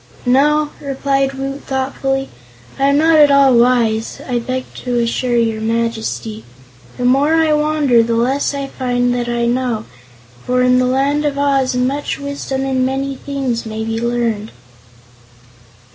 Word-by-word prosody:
"No," 295 Hz, +4 st, +3 dB
replied 275 Hz, -1 st, -1 dB
Woot, 275 Hz, +1 st, -5 dB
thoughtfully, 270 Hz, 0 st, -2 dB, 0.5 s
"I 270 Hz, -, +2 dB
am 280 Hz, 0 st, +3 dB
not 320 Hz, +1 st, +4 dB
at 295 Hz, -1 st, +7 dB
all 280 Hz, -2 st, +5 dB
wise, 235 Hz, -2 st, +2 dB
I 245 Hz, -2 st, 0 dB
beg 255 Hz, +2 st, -3 dB
to 245 Hz, -1 st, -2 dB
assure 240 Hz, +1 st, 0 dB
your 225 Hz, -2 st, 0 dB
Majesty. 225 Hz, -1 st, -2 dB, 0.5 s
The 250 Hz, -, -2 dB
more 275 Hz, +5 st, +3 dB
I 320 Hz, -1 st, +3 dB
wander 300 Hz, -5 st, +3 dB
the 230 Hz, 0 st, 0 dB
less 265 Hz, +5 st, 0 dB
I 280 Hz, 0 st, -3 dB
find 245 Hz, -2 st, -1 dB
that 240 Hz, -1 st, -2 dB
I 240 Hz, 0 st, 0 dB
know, 240 Hz, -2 st, -1 dB, 0.6 s
for 250 Hz, 0 st, +1 dB
in 250 Hz, 0 st, +4 dB
the 255 Hz, -, +2 dB
Land 275 Hz, +3 st, +1 dB
of 290 Hz, -2 st, -1 dB
Oz 275 Hz, -2 st, +1 dB
much 265 Hz, +4 st, -1 dB
wisdom 280 Hz, -1 st, -4 dB
and 260 Hz, -1 st, 0 dB
many 270 Hz, +1 st, -1 dB
things 265 Hz, -4 st, -3 dB
may 220 Hz, 0 st, -5 dB
be 225 Hz, 0 st, -3 dB
learned." 235 Hz, -3 st, -1 dB
260 Hz, 155 wpm, -17 LUFS, 235-275 Hz, 0.6 s, at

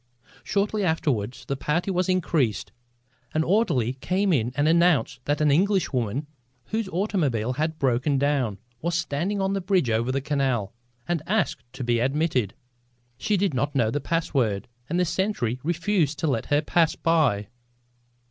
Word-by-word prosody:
Shortly 205 Hz, +1 st, 0 dB
afterward 130 Hz, -, 0 dB
the 140 Hz, -, -2 dB
party 165 Hz, +8 st, -1 dB
was 180 Hz, 0 st, 0 dB
increased. 160 Hz, -, 0 dB, 0.6 s
An 155 Hz, -, +3 dB
orderly 160 Hz, -, +2 dB
came 185 Hz, +8 st, 0 dB
in 120 Hz, -4 st, +1 dB
and 145 Hz, +1 st, +2 dB
announced 165 Hz, -7 st, +3 dB
that 145 Hz, +1 st, 0 dB
an 150 Hz, -1 st, +4 dB
Englishwoman, 145 Hz, -, +1 dB, 0.4 s
whose 220 Hz, -2 st, -2 dB
automobile 150 Hz, -, 0 dB
had 155 Hz, +3 st, -2 dB
broken 135 Hz, +1 st, +1 dB
down, 135 Hz, -7 st, +1 dB, 0.2 s
was 170 Hz, +1 st, -1 dB
standing 170 Hz, +4 st, -1 dB
on 195 Hz, 0 st, 0 dB
the 195 Hz, -, -1 dB
bridge 180 Hz, -, +1 dB
over 115 Hz, +3 st, +1 dB
the 135 Hz, -, 0 dB
canal 135 Hz, -8 st, -1 dB, 0.3 s
and 175 Hz, -3 st, 0 dB
asked 200 Hz, -, -1 dB
to -, -, -5 dB
be 120 Hz, -1 st, +1 dB
admitted. 135 Hz, -, 0 dB, 0.6 s
She 210 Hz, -, +1 dB
did 195 Hz, -4 st, +1 dB
not 140 Hz, +3 st, -1 dB
know 115 Hz, -4 st, +2 dB
the 145 Hz, -, -2 dB
password 130 Hz, -10 st, 0 dB, 0.2 s
and 175 Hz, +3 st, 0 dB
the 180 Hz, -, +3 dB
sentry 170 Hz, -, -1 dB
refused 170 Hz, -1 st, 0 dB
to -, -, -2 dB
let 125 Hz, -6 st, -1 dB
her 145 Hz, +1 st, +2 dB
pass 165 Hz, +1 st, +2 dB
by. 140 Hz, -12 st, +1 dB
150 Hz, 155 wpm, -25 LUFS, 125-180 Hz, 0.6 s, an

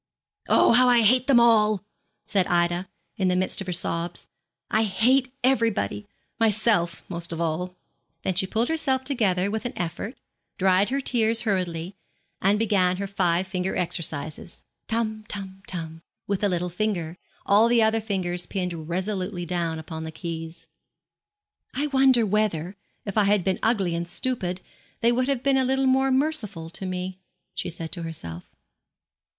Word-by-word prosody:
'Oh, -, -, +5 dB
how 250 Hz, +2 st, +6 dB
I 240 Hz, -2 st, +5 dB
hate 250 Hz, +4 st, +4 dB
them 265 Hz, -4 st, +6 dB
all!' 215 Hz, -4 st, +4 dB, 0.4 s
said 195 Hz, -3 st, +1 dB
Ida, 175 Hz, +1 st, +1 dB, 0.3 s
in 190 Hz, -, +1 dB
the 180 Hz, -, +2 dB
midst 185 Hz, +2 st, 0 dB
of 190 Hz, -, -6 dB
her -, -, -2 dB
sobs. 170 Hz, 0 st, -3 dB, 0.5 s
'I 220 Hz, +1 st, +3 dB
hate 250 Hz, +6 st, +2 dB
everybody, 230 Hz, -5 st, +1 dB, 0.3 s
myself 215 Hz, -5 st, +2 dB
most 170 Hz, -2 st, -6 dB
of 165 Hz, -, -4 dB
all!' 170 Hz, +2 st, -2 dB, 0.5 s
Then 190 Hz, -, 0 dB
she 185 Hz, +1 st, +2 dB
pulled 225 Hz, +4 st, +1 dB
herself 275 Hz, -5 st, 0 dB
together 205 Hz, -8 st, +1 dB
with 220 Hz, 0 st, -2 dB
an 245 Hz, -, -4 dB
effort, 175 Hz, +8 st, -4 dB, 0.4 s
dried 190 Hz, +1 st, +3 dB
her 275 Hz, +2 st, -1 dB
tears 230 Hz, -3 st, +2 dB
hurriedly, 180 Hz, -4 st, -2 dB, 0.5 s
and 200 Hz, +2 st, +3 dB
began 195 Hz, -4 st, +2 dB
her 200 Hz, -, -3 dB
five 185 Hz, -2 st, +1 dB
finger 185 Hz, 0 st, -2 dB
exercises, 160 Hz, -2 st, -2 dB, 0.2 s
tum, 220 Hz, -1 st, -1 dB
tum, 195 Hz, -2 st, -6 dB
tum, 165 Hz, -2 st, -5 dB, 0.2 s
with 200 Hz, -1 st, -1 dB
the 205 Hz, -, +2 dB
little 180 Hz, -1 st, -1 dB
finger, 180 Hz, -3 st, -2 dB, 0.3 s
all 210 Hz, +3 st, +5 dB
the 235 Hz, -1 st, +4 dB
other 220 Hz, 0 st, +2 dB
fingers 180 Hz, -4 st, -2 dB
pinned 175 Hz, -5 st, -4 dB
resolutely 185 Hz, 0 st, -2 dB
down 170 Hz, -2 st, -2 dB
upon 160 Hz, 0 st, -6 dB
the 160 Hz, -, -6 dB
keys. 165 Hz, 0 st, -6 dB, 1.1 s
'I 285 Hz, +3 st, 0 dB
wonder 265 Hz, -3 st, +5 dB
whether, 200 Hz, -4 st, 0 dB, 0.3 s
if 200 Hz, +1 st, 0 dB
I 205 Hz, -, +4 dB
had 200 Hz, -2 st, +3 dB
been 190 Hz, 0 st, 0 dB
ugly 200 Hz, -7 st, +1 dB
and 170 Hz, 0 st, -3 dB
stupid, 185 Hz, -4 st, -2 dB, 0.4 s
they 235 Hz, +1 st, +4 dB
would 255 Hz, +2 st, +1 dB
have 270 Hz, -3 st, -1 dB
been 275 Hz, -1 st, +3 dB
a 265 Hz, -, +3 dB
little 265 Hz, +1 st, +1 dB
more 265 Hz, +1 st, +3 dB
merciful 250 Hz, -, 0 dB
to 190 Hz, -, -2 dB
me?' 185 Hz, 0 st, -4 dB, 0.3 s
she -, -, -3 dB
said 165 Hz, -1 st, -6 dB
to 175 Hz, -, -5 dB
herself. 90 Hz, -, -7 dB
195 Hz, 165 wpm, -25 LUFS, 175-225 Hz, 1.1 s, how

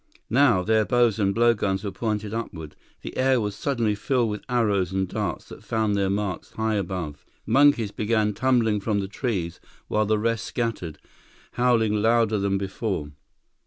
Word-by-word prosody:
Now, 120 Hz, -10 st, +4 dB
their 110 Hz, +2 st, +3 dB
bows 120 Hz, -2 st, +2 dB
and 100 Hz, -2 st, +2 dB
blowguns 105 Hz, -3 st, +2 dB
were 100 Hz, -, -3 dB
pointed 105 Hz, +1 st, -3 dB
upward. 80 Hz, -9 st, -6 dB, 0.3 s
The -, -, -7 dB
air 130 Hz, -1 st, +3 dB
was 105 Hz, -2 st, -2 dB
suddenly 120 Hz, -6 st, 0 dB
filled 120 Hz, +2 st, 0 dB
with 105 Hz, -, -5 dB
arrows 105 Hz, -7 st, +1 dB
and 95 Hz, 0 st, 0 dB
darts -, -, -4 dB
that -, -, -11 dB
found 110 Hz, -2 st, 0 dB
their 100 Hz, -1 st, +1 dB
marks 100 Hz, -2 st, -3 dB
high 110 Hz, 0 st, -1 dB
above. 90 Hz, -7 st, -3 dB, 0.2 s
Monkeys 130 Hz, -3 st, +4 dB
began 105 Hz, -1 st, 0 dB
tumbling 115 Hz, -3 st, +2 dB
from 105 Hz, +1 st, -1 dB
the 95 Hz, -, -3 dB
trees, 95 Hz, -7 st, -3 dB, 0.3 s
while 105 Hz, -1 st, +1 dB
the 110 Hz, 0 st, +2 dB
rest 115 Hz, 0 st, -1 dB
scattered, 115 Hz, -10 st, -3 dB, 0.5 s
howling 115 Hz, -4 st, +2 dB
louder 115 Hz, -1 st, +3 dB
than 100 Hz, 0 st, 0 dB
before. 95 Hz, -5 st, -3 dB
105 Hz, 160 wpm, -25 LUFS, 100-115 Hz, 0.5 s, Now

